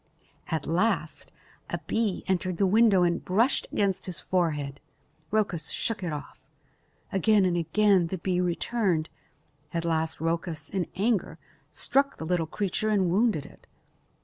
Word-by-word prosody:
At 160 -3 -2
last 180 +8 0 0.4
a - - -1
bee 220 -4 -1
entered 185 -1 -1
the 195 - +3
window 205 -1 +5
and 170 -1 +1
brushed 225 +9 +2
against 195 -2 0
his 175 -4 -4
forehead. 150 -6 -1 0.5
Rhoecus 195 -7 0
shook 225 -3 -1
it 170 - -2
off. 150 -1 -7 0.7
Again 200 +1 +3
and 180 -1 +1
again 180 +2 +3
the 190 - -3
bee 180 +1 0
returned. 180 -1 0 0.6
At 170 -1 -2
last 160 -1 0
Rhoecus, 165 -1 -2
in 185 -4 -1
anger, 210 +2 0 0.3
struck 275 +1 +1
the 160 - -5
little 170 -1 0
creature 205 +4 -1
and 190 -5 +2
wounded 200 - +2
it. - - -16
180 Hz, 145 wpm, -27 LUFS, 165-205 Hz, 0.7 s, window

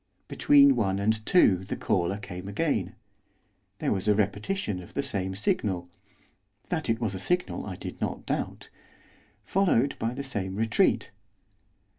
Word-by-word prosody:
Between 280 -1 +5
one 95 -1 +1
and 110 +2 0
two 140 - +5
the 95 - -4
caller 95 0 0
came 95 -2 -8
again; 105 - -1 0.8
there - - -1
was 95 0 -1
a 105 - +5
repetition 105 - -1
of 90 - -14
the 140 - 0
same 95 -8 -3
signal, 95 -3 -1 0.8
that 160 -7 -1
it 115 0 +1
was 110 -5 -1
a 95 - -4
signal 180 - -1
I - - -5
did - - -8
not - - -3
doubt; - - -4 0.7
followed 155 -9 +2
by 115 +2 -2
the 140 - -4
same 100 -8 -3
retreat. 110 +1 +2
105 Hz, 150 wpm, -27 LUFS, 95-140 Hz, 0.8 s, Between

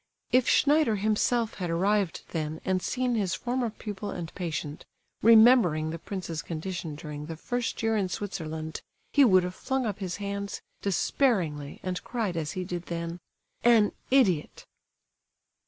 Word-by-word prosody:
If 255 0 +4
Schneider 295 -6 +4
himself 215 +3 +1
had 180 -2 -2
arrived 195 +2 +1
then 155 -1 -3
and 185 -1 +1
seen 250 +3 -1
his 195 -5 0
former 245 +2 -1
pupil 210 -2 -6
and 170 -4 -6
patient, 155 -4 -4 0.4
remembering 220 -9 +6
the 165 - -5
prince's 170 -3 -5
condition 165 -1 -5
during 150 0 -7
the 165 - -5
first 245 +8 -3
year 225 0 +2
in 195 -3 0
Switzerland, 160 -5 -4 0.3
he 285 - +6
would 185 -7 +6
have 180 0 -3
flung 265 +5 -2
up 210 -2 -3
his 185 -3 -3
hands, 200 0 -4 0.2
despairingly, 180 - 0
and 185 -1 -3
cried, 225 -7 -2
as 155 -2 -2
he 185 - -3
did 175 -1 -5
then: 170 0 -4 0.4
"An 230 -3 +5 0.2
idiot!" 200 - +2
190 Hz, 150 wpm, -28 LUFS, 165-225 Hz, 0.4 s, remembering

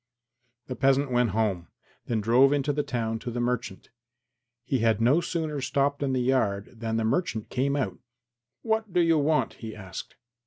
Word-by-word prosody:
The 130 - -5
peasant 135 +1 +2
went 120 -1 +2
home, 95 -4 -1 0.4
then 115 -3 0
drove 125 +6 +5
into 145 0 0
the 150 - 0
town 115 -4 -2
to 120 - -5
the 120 0 -4
merchant. 120 -6 -3 0.7
He 130 +1 0
had 115 -1 +2
no 130 +9 +4
sooner 160 -4 -3
stopped 140 +2 0
in 140 -2 0
the 125 -1 +1
yard 105 -6 0
than 115 -1 -2
the 115 - 0
merchant 115 -3 -1
came 140 +2 0
out. 140 - -2 0.6
"What 220 -2 -1
do 175 - +2
you 165 -2 +4
want?" 150 +1 +1
he 110 -2 -6
asked. 95 -4 -8
125 Hz, 180 wpm, -27 LUFS, 115-145 Hz, 0.7 s, drove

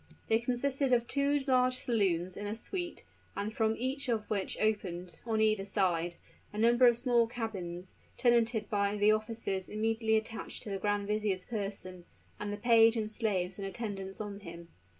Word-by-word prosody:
They 225 - +4
consisted 255 +3 0
of 235 -1 +3
two 280 +2 +1
large 255 -1 +3
saloons 190 -8 0
in 205 - -5
a 210 - -3
suit, 350 - -5 0.3
and 210 +2 -3
from 220 -1 +2
each 260 +2 -2
of 220 -3 0
which 200 -3 -1
opened, 180 -5 -2
on 220 -1 +1
either 215 -2 +3
side, 175 -4 0 0.4
a 210 - -8
number 240 +3 +5
of 240 -1 +5
small 240 -2 +3
cabins, 190 -7 -5 0.2
tenanted 235 -3 +3
by 200 0 0
the 205 +1 +5
officers 215 -3 -2
immediately 220 +1 +1
attached 220 +1 -4
to 210 - -6
the 195 - -2
grand 205 0 0
vizier's 210 -3 -1
person, 195 -5 -5 0.3
and 205 0 -3
the 205 - -3
page 230 +1 +5
and 215 -1 -2
slaves 195 -4 -1
in - - -4
attendance 195 -1 -5
on 205 -2 -5
him. 170 -3 -10
215 Hz, 170 wpm, -32 LUFS, 195-235 Hz, 0.4 s, number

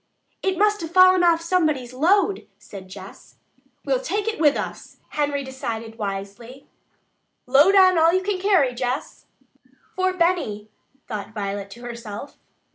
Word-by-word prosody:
"It 380 -2 -1
must 420 0 +2
have 325 - -5
fallen 370 +1 +6
off 335 -1 +3
somebody's 310 -8 0
load," 385 +8 +1
said 190 -2 -12
Jess. - - -12 0.5
"We'll - - +1
take 425 -4 -3
it 445 - -2
with 295 -3 +4
us," - - -7
Henry 285 -1 -1
decided 230 -4 -6
wisely. 200 +6 -6 0.8
"Load 285 +10 +5
on 370 -3 +6
all 325 +1 +5
you 375 +2 0
can 395 -1 -2
carry, 365 -10 +2
Jess." 250 +2 -4 0.7
"For 370 0 +1
Benny," 335 - -1 0.4
thought 215 +1 -7
Violet 200 -1 -4
to 240 - -14
herself. 235 0 -8
290 Hz, 140 wpm, -22 LUFS, 230-370 Hz, 0.8 s, fallen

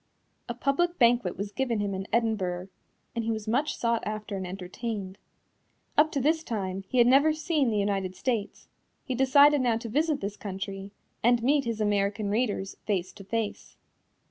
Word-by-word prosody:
A 240 - -3
public 345 +8 0
banquet 235 - +3
was 200 +2 -4
given 245 -4 -1
him 205 -1 -1
in 190 +1 -4
Edinburgh, 195 -6 0 0.5
and 230 - -1
he 225 - -2
was 220 -1 -3
much 280 +7 +1
sought 235 -1 +1
after 215 -1 -4
and 190 -1 -4
entertained. 195 +1 -5 0.8
Up 310 +1 +4
to 280 - +1
this 315 +4 +2
time 195 -6 -3
he 255 - -2
had 240 - +7
never 280 +5 +5
seen 310 -4 +1
the 215 - 0
United 195 -2 -1
States; 225 -4 -3 0.4
he 260 - -3
decided 280 +3 +5
now 240 -3 +2
to 230 0 -6
visit 300 +4 +1
this 200 +1 -5
country 195 0 -6 0.3
and 240 0 +3
meet 280 +1 +3
his 230 -2 -2
American 205 0 0
readers 210 -4 -1
face 185 -4 -1
to 200 - -11
face. 220 +2 -4
225 Hz, 175 wpm, -28 LUFS, 200-255 Hz, 0.8 s, had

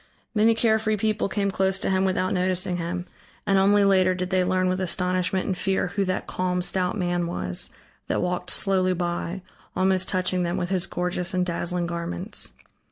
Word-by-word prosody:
Many 225 +1 +4
carefree 220 -1 +2
people 215 0 0
came 200 0 0
close 190 0 +1
to - - +1
him 190 0 +2
without 185 0 0
noticing 185 -1 +1
him, 175 +1 -3 0.4
and 195 -2 +3
only 200 +1 +4
later 185 -1 +4
did 185 +1 -3
they 185 -1 +3
learn 185 0 +1
with 185 +1 0
astonishment 185 +1 0
and 190 - -1
fear 190 0 0
who 200 +2 -1
that 185 0 -2
calm 180 0 -1
stout 185 +2 +1
man 175 -2 0
was, 90 - -3 0.4
that - - 0
walked 180 0 -2
slowly 185 -2 +2
by, 175 +1 -3 0.3
almost 185 0 +1
touching 185 0 0
them 175 0 -1
with 180 +1 -2
his 185 -1 +1
gorgeous 180 0 -1
and 180 0 +2
dazzling 175 0 -1
garments. 170 - -2
185 Hz, 180 wpm, -25 LUFS, 180-190 Hz, 0.4 s, Many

